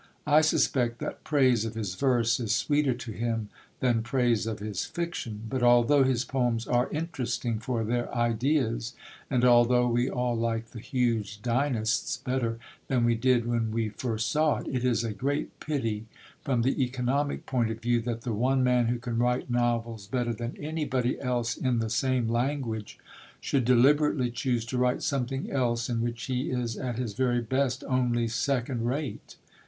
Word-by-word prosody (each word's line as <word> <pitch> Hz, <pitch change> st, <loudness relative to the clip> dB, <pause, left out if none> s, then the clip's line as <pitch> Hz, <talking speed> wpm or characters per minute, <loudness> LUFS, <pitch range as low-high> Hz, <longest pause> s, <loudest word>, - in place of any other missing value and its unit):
I 150 Hz, +1 st, +5 dB
suspect 125 Hz, -6 st, +2 dB
that -, -, -6 dB
praise 130 Hz, -7 st, +3 dB
of 115 Hz, 0 st, -4 dB
his 105 Hz, -5 st, -3 dB
verse 120 Hz, 0 st, +2 dB
is 110 Hz, -3 st, 0 dB
sweeter 145 Hz, 0 st, +1 dB
to 120 Hz, -1 st, -7 dB
him 115 Hz, -1 st, -2 dB, 0.3 s
than 120 Hz, -3 st, +2 dB
praise 120 Hz, -2 st, +1 dB
of 110 Hz, -1 st, -2 dB
his 105 Hz, -2 st, -3 dB
fiction; 145 Hz, -11 st, -4 dB
but, 130 Hz, +2 st, -2 dB
although 120 Hz, +3 st, +5 dB
his 130 Hz, -2 st, +1 dB
poems 120 Hz, -3 st, 0 dB
are 125 Hz, 0 st, +1 dB
interesting 130 Hz, -7 st, -2 dB
for 115 Hz, 0 st, -2 dB
their 120 Hz, +2 st, -1 dB
ideas, 120 Hz, 0 st, 0 dB, 0.3 s
and 125 Hz, -2 st, +2 dB
although 125 Hz, 0 st, +5 dB
we 120 Hz, +2 st, +1 dB
all 125 Hz, -1 st, -1 dB
like 115 Hz, 0 st, -2 dB
the 115 Hz, -, -8 dB
huge 115 Hz, -4 st, -1 dB
Dynasts 125 Hz, -1 st, 0 dB
better 125 Hz, -2 st, -2 dB, 0.3 s
than 125 Hz, -3 st, +2 dB
we 120 Hz, -, +4 dB
did 120 Hz, 0 st, +2 dB
when 115 Hz, -2 st, 0 dB
we 110 Hz, 0 st, -1 dB
first 115 Hz, +2 st, -2 dB
saw 155 Hz, 0 st, +2 dB
it, -, -, -7 dB
it 125 Hz, -1 st, -1 dB
is 120 Hz, -2 st, +2 dB
a 115 Hz, -2 st, -2 dB
great 140 Hz, +8 st, -3 dB
pity 115 Hz, -8 st, -2 dB, 0.3 s
from 125 Hz, -4 st, 0 dB
the 135 Hz, +2 st, +1 dB
economic 130 Hz, +3 st, -1 dB
point 120 Hz, -4 st, 0 dB
of 110 Hz, 0 st, -4 dB
view 120 Hz, 0 st, +1 dB
that 115 Hz, 0 st, -3 dB
the 120 Hz, -, -2 dB
one 130 Hz, +4 st, +2 dB
man 125 Hz, -2 st, +3 dB
who 120 Hz, +1 st, 0 dB
can 120 Hz, -1 st, -3 dB
write 125 Hz, +1 st, 0 dB
novels 115 Hz, -3 st, -1 dB
better 120 Hz, +1 st, -1 dB
than 120 Hz, +2 st, -5 dB
anybody 145 Hz, -5 st, -1 dB
else 125 Hz, -3 st, -1 dB
in 125 Hz, -2 st, 0 dB
the 110 Hz, -1 st, -1 dB
same 130 Hz, -2 st, +1 dB
language 115 Hz, -2 st, -2 dB, 0.4 s
should 135 Hz, -4 st, 0 dB
deliberately 130 Hz, +1 st, +4 dB
choose 120 Hz, -2 st, -1 dB
to 125 Hz, +2 st, -2 dB
write 125 Hz, 0 st, +1 dB
something 135 Hz, 0 st, -2 dB
else 120 Hz, -3 st, 0 dB
in 115 Hz, -1 st, 0 dB
which 120 Hz, 0 st, -3 dB
he 130 Hz, 0 st, -2 dB
is 120 Hz, -3 st, -2 dB
at 120 Hz, -1 st, -4 dB
his 120 Hz, -4 st, -3 dB
very 125 Hz, +1 st, +1 dB
best 130 Hz, +1 st, 0 dB
only 120 Hz, -3 st, +1 dB
second 120 Hz, 0 st, -1 dB
rate. 140 Hz, +3 st, -4 dB
120 Hz, 175 wpm, -28 LUFS, 115-130 Hz, 0.4 s, I